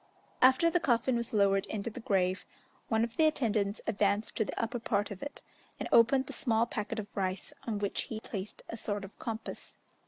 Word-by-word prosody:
After 265 +6 +6
the 350 - +3
coffin 245 -4 +2
was 235 -1 -1
lowered 195 -2 +3
into 215 +2 -3
the 245 - -7
grave, 190 -4 +1 0.4
one 220 -1 +2
of 230 0 -4
the 315 - +6
attendants 215 -8 0
advanced 205 +1 +1
to - - +3
the - - -5
upper 235 +1 -1
part 205 -3 0
of 195 - -7
it, 285 - -7 0.4
and - - -3
opened 260 +3 +6
the - - -7
small 230 -5 +2
packet 225 -1 -4
of 215 - -2
rice, 185 -1 -2
on 220 -3 0
which 205 -1 -1
he 220 - -5
placed 205 -2 -6
a 230 - -5
sort 205 -2 -3
of 195 - -13
compass. 225 -1 -6
220 Hz, 200 wpm, -31 LUFS, 200-235 Hz, 0.4 s, After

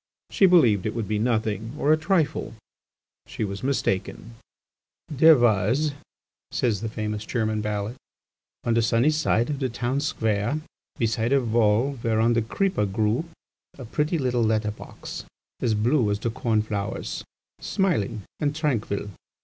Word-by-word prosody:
She 195 - +5
believed 120 - +4
it 110 - -3
would 115 -3 -2
be 105 -1 -1
nothing 110 +1 -1
or 150 +1 +3
a - - +6
trifle; 155 - 0 0.7
she - - -4
was 100 -1 -4
mistaken. 115 -4 -2 0.8
"There 160 +1 +6
was," 120 +6 +2 0.6
says 110 -5 0
the 115 - -3
famous 105 -1 -3
German 110 -2 -1
ballad, 105 +2 -3 0.7
"on 115 - +1
the 115 - +3
sunny 115 +6 +3
side 150 -5 +1
of 140 - -3
the 130 -2 0
town 120 +3 -1
square, 110 -2 0 0.4
beside 115 0 0
a 140 - +5
wall 120 +2 +2
whereon 115 +1 +2
the 115 - +2
creeper 115 - 0
grew, 110 - 0 0.5
a 130 - -8
pretty 150 +8 0
little 125 -4 0
letter 110 -1 +1
box, - - -9 0.4
as 115 -3 +1
blue 115 +2 +2
as 100 - +1
the 115 +2 -2
corn 110 -1 0
flowers, 105 0 -4 0.4
smiling 115 - -1 0.2
and 145 -1 0
tranquil. 115 -10 -1
115 Hz, 150 wpm, -25 LUFS, 105-140 Hz, 0.8 s, a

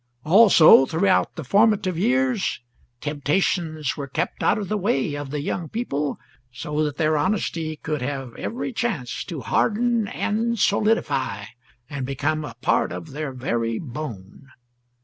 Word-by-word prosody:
Also, 170 -7 +7
throughout 185 +4 +1
the 160 - -6
formative 200 - +3
years 245 +3 +1 0.4
temptations 155 +1 -1
were 140 -2 -5
kept 160 +6 -3
out - - +3
of 205 -2 -4
the 215 - -1
way 205 -6 0
of 145 -1 -5
the 145 +1 -3
young 160 +2 -3
people, 150 - -2 0.3
so 150 +5 -2
that 150 -2 -3
their 155 -1 +2
honesty 165 -2 -1
could 150 -2 -4
have 135 -2 -4
every 250 +2 -4
chance 215 - -2
to 160 -6 -6
harden 230 - +1
and 230 +4 -1
solidify, 200 - +1 0.4
and 140 -3 -5
become 145 +3 -1
a 130 -6 -8
part - - +2
of 160 - -7
their 150 0 -4
very 115 -3 -2
bone. 125 - -8
155 Hz, 145 wpm, -23 LUFS, 140-205 Hz, 0.4 s, Also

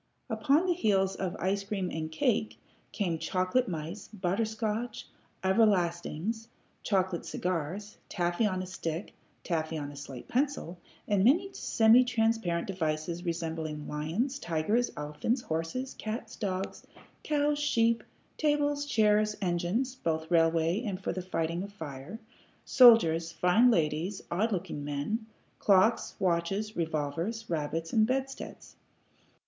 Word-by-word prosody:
Upon 300 +4 +3
the 360 - +3
heels 195 - +2
of 185 -2 -3
ice 195 +2 0
cream 195 -2 -3
and 155 0 -4
cake 215 +7 0 0.3
came 175 -7 -1
chocolate 185 +10 +1
mice, 165 +3 -5
butter 200 +1 -1
scotch, 220 +1 -3 0.4
"everlastings," 190 +1 +1 0.3
chocolate 190 -3 0
cigars, 185 +4 -3
taffy 175 +4 +1
on 185 -2 -2
a - - -5
stick, 170 -1 -5 0.3
taffy 160 -2 -1
on 145 -1 -5
a - - -11
slate 140 -3 -8
pencil, 255 - -1 0.3
and 200 -2 +2
many 350 - +3
semi 225 -3 +5
transparent 225 -8 +1
devices 165 -2 -2
resembling 160 -3 -3
lions, 180 - -2
tigers, 190 - 0
elephants, 150 - -1
horses, 165 +12 -3
cats, 220 +2 -5
dogs, 190 -3 -3 0.4
cows, 295 -1 +1
sheep, 230 -6 +2 0.4
tables, 290 -1 +1
chairs, 215 -4 +3
engines 190 +7 0
(both 160 -9 -2
railway 165 +3 +3
and 200 -6 -3
for 190 - -2
the 185 - -3
fighting 170 -1 -2
of 200 +1 -6
fire), 155 0 -7 0.5
soldiers, 170 -11 +6
fine 180 +9 +4
ladies, 170 0 +1
odd 210 +7 +1
looking 175 -6 -3
men, 145 +11 -2 0.3
clocks, 205 +3 +3
watches, 190 +4 0
revolvers, 165 +7 -2
rabbits, 160 +1 -2
and 220 -1 +4
bedsteads. 270 +1 -4
190 Hz, 125 wpm, -30 LUFS, 165-225 Hz, 0.5 s, soldiers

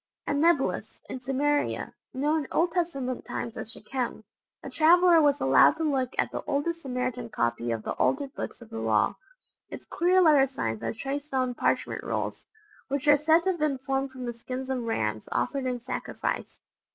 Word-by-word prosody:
At 285 - 0
Nablous, 315 -2 +1
in 260 - -4
Samaria, 280 +3 0 0.2
known 295 +3 0
in - - -10
Old 340 +1 +2
Testament 275 -8 -2
times 230 - -5
as 225 - -3
Shechem, 250 -4 -4 0.4
a - - -6
traveller 340 +1 +6
was 290 -1 +3
allowed 135 - +5
to 325 - -2
look 265 -4 0
at - - +1
the - - -4
oldest 315 +4 -1
Samaritan 250 -3 -3
copy 120 - -1
of 115 -1 -2
the - - -3
altered 275 0 0
books 245 - -6
of 225 - -18
the 225 - -5
Law. - - +1 0.5
Its - - -9
queer 360 +2 +2
letter 300 -6 +6
signs 115 - -3
are - - -2
traced 275 +5 -5
on 255 -1 +1
parchment - - -1
rolls, - - -3 0.4
which 280 +2 -2
are 290 - +8
said 320 +3 +3
to 380 - +2
have 345 - -5
been 300 -3 +1
formed 270 +1 -2
from 260 -1 -8
the 240 - -3
skins 255 +3 -5
of 255 -2 -1
rams 110 - -2
offered 270 0 -1
in 250 -1 -2
sacrifice. 235 - -4
270 Hz, 190 wpm, -27 LUFS, 250-300 Hz, 0.5 s, are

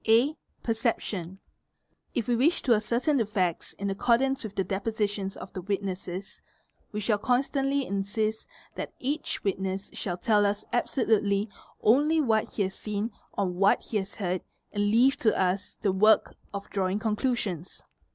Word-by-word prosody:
(a) 240 +7 +5 0.3
PerceptionS'—®), 215 -6 -1 0.8
If 235 -4 -1
we 240 - +3
wish 285 +9 +3
to 245 - +5
ascertain 235 +7 +1
the 230 - +2
facts 185 -5 -1
in 200 0 -3
accordance 250 +6 +2
with 210 -2 -6
the 190 - +1
depositions 200 0 -2
of - - -9
the 185 - -4
witnesses 190 -1 -4 0.5
we 210 - -3
shall 210 0 +1
constantly 275 +3 +1
insist 215 +2 -1 0.3
that - - -5
each 285 +5 -2
witness 195 0 -2
shall 175 -3 -3
tell 210 +2 +3
us 205 +1 0
absolutely 215 -4 +2 0.3
only 295 +8 +5
what 225 -7 +1
he 205 - +2
has 190 0 -2
seen 210 +3 -3 0.2
or 200 - 0
what 185 +2 +3
he 220 - -2
has 195 0 -4
heard, 185 -3 -1 0.3
and 205 -1 +1
leave 250 +6 +5
to 220 - +2
us 190 +1 0
— - - -42
the 200 - +3
work 215 +3 +4 0.2
of 200 0 -6
drawing 190 0 0
conclusions. 210 - -1
210 Hz, 160 wpm, -28 LUFS, 195-235 Hz, 0.8 s, a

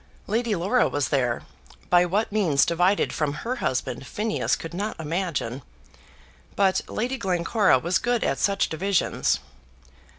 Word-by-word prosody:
Lady 225 +1 0
Laura 200 +8 +2
was 145 -1 -1
there; 125 -4 0 0.5
by 175 0 +6
what 205 +5 0
means 180 -10 +3
divided 180 +4 +2
from 150 -2 -1
her 250 +2 -1
husband 130 - -2
Phineas 215 +1 0
could 165 +1 -8
not 205 +3 -4
imagine; 160 -6 -2 0.9
but 195 -2 +3
Lady 250 +4 -2
Glencora 185 - +2
was 170 +7 0
good 240 -1 0
at 135 - 0
such 195 0 +2
divisions. 190 +3 0
185 Hz, 135 wpm, -25 LUFS, 160-210 Hz, 0.9 s, by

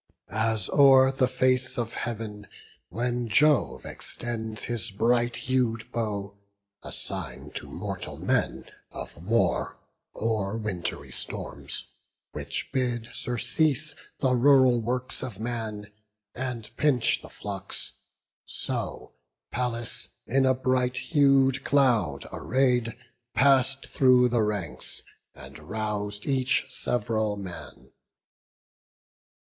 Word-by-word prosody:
As 110 -2 +1
o'er 135 -2 +7
the 130 -1 +2
face 130 0 +1
of 115 -1 -2
Heav'n 110 -3 -5 0.4
when 120 +3 -1
Jove 150 +5 +3
extends 110 -3 -5
His 120 -1 -3
bright 120 +3 +2
hued 120 -4 0
bow, 105 -3 -2 0.5
a - - -8
sign - - -6
to - - -7
mortal - - -5
men - - 0 0.2
Of 85 - -8
war, 115 +5 +1 0.4
or 110 -2 0
wintry 100 -6 -4
storms, - - -6 0.5
which - - -5
bid 120 -3 0
surcease 145 +4 0 0.2
The 130 -2 +2
rural 130 -2 +6
works 125 +2 -2
of 105 -6 -6
man, 110 -3 -4 0.4
and 125 -3 -5
pinch 140 -6 +2
the - - -11
flocks; 100 -1 -6 0.5
So - - -4 0.4
Pallas, 120 -2 -3 0.2
in 135 +2 +3
a 130 - +4
bright 125 -1 +1
hued 135 -2 +4
cloud 115 - +2
array'd, 125 -2 +1 0.4
Pass'd 135 0 +4
through 125 -2 +5
the 120 -1 +2
ranks, 105 -5 -3 0.3
and - - -11
rous'd 105 -1 -3
each 130 -2 +2
sev'ral 110 -3 -1
man. 95 -4 -9
120 Hz, 105 wpm, -27 LUFS, 110-130 Hz, 0.5 s, o'er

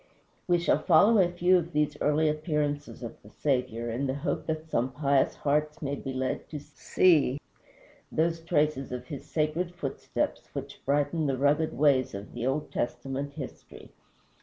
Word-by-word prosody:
We 175 -1 +4
shall 170 - +2
follow 200 +6 +5
a 180 -2 +4
few 180 +1 +4
of 170 0 -6
these 150 0 +1
early 150 +2 +3
appearances 150 -3 -2
of 115 - -8
the 105 - -15
Saviour, 120 -3 -1
in 130 +5 -1
the 130 - -1
hope 155 +3 -3
that 160 0 -3
some 130 -4 0
pious 140 0 +2
hearts 150 +1 0
may 140 -2 -3
be 135 -1 -4
led 130 0 -3
to 150 - -5
see 145 -2 +2 0.7
those 165 +1 +1
traces 150 -5 0
of 125 0 -5
his 140 +1 -8
sacred 165 +3 -1
footsteps, 140 -6 -3
which - - -7
brighten 145 +2 +1
the 135 -1 0
rugged 145 +4 +2
ways 135 -6 +3
of 100 +1 -8
the 120 - -2
Old 145 +3 -1
Testament 135 +3 -3
history. 140 -4 -9
145 Hz, 165 wpm, -28 LUFS, 135-160 Hz, 0.7 s, follow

